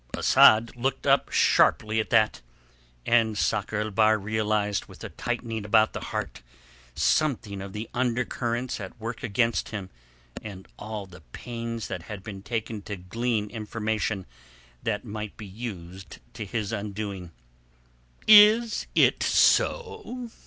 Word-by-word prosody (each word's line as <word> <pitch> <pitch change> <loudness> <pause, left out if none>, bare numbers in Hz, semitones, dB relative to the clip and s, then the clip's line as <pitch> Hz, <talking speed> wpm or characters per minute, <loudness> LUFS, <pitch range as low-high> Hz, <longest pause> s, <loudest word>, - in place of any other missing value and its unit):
Asad 115 +2 +5
looked 130 +2 -2
up - - +3
sharply 110 +1 +3
at 110 - -2
that, 110 - +3 0.6
and 115 -2 +2
Sakr 95 +4 0
el 110 0 -3
Bahr 110 +1 +4
realized 105 0 -1
with - - -13
a - - -5
tightening 115 -3 -4
about 110 +1 +3
the - - -5
heart - - -5 0.5
something 110 -10 0
of 100 0 -7
the 110 +1 -5
undercurrents 120 0 -1
at 100 +4 -9
work 115 +1 -5
against 115 0 0
him 100 -4 -6 0.5
and 95 -3 -9
all 105 -2 -6
the 90 -1 -14
pains 115 -2 -5
that 90 - -5
had 100 +2 -8
been 100 -2 -8
taken 110 0 -4
to 105 +1 -6
glean 105 +4 -2
information 110 -2 -3 0.6
that 105 +1 -2
might 105 -1 -6
be 110 - -8
used 95 -3 -8 0.2
to 110 -1 -6
his 105 +1 -3
undoing. 100 -3 -5 1.0
"Is 215 +2 +7
it - - +4
so?" 430 - +1
110 Hz, 135 wpm, -26 LUFS, 100-115 Hz, 1.0 s, Is